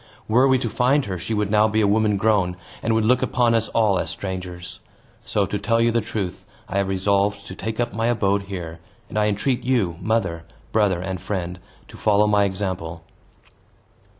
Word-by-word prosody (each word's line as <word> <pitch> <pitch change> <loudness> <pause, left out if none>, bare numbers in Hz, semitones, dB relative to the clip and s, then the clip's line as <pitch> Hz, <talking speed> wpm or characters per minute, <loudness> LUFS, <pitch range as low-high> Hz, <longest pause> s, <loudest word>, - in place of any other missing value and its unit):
Were 125 +5 +4
we 130 -1 +4
to 120 - -2
find 130 +5 +2
her, 95 -3 -4
she 110 +6 -3
would 105 -1 -1
now 105 0 +5
be 110 0 0
a 105 - +3
woman 105 0 +2
grown, 95 -4 +1 0.2
and 115 0 +1
would 110 -1 +2
look 125 +2 +3
upon 120 -2 +2
us 115 -1 +1
all 105 -4 +2
as 80 - -2
strangers. 90 -1 -6 0.4
So, 100 - 0
to 100 +2 -3
tell 115 +3 +1
you 115 0 +3
the 115 0 +1
truth, 95 -4 -4 0.2
I 95 - -3
have 100 - 0
resolved 100 +1 +1
to 95 - -8
take 110 +4 -5
up 120 -4 -1
my 115 +2 0
abode 100 -4 +1
here; 85 -4 -6 0.3
and 110 - -1
I 105 - +3
entreat 105 +5 0
you, 115 -10 +1
mother, 95 -7 0 0.3
brother, 105 -5 +2
and 95 -1 -4
friend, 90 -3 -4 0.3
to - - -13
follow 105 -1 +3
my 105 -1 +3
example." 95 -4 -4
105 Hz, 200 wpm, -23 LUFS, 95-110 Hz, 0.4 s, now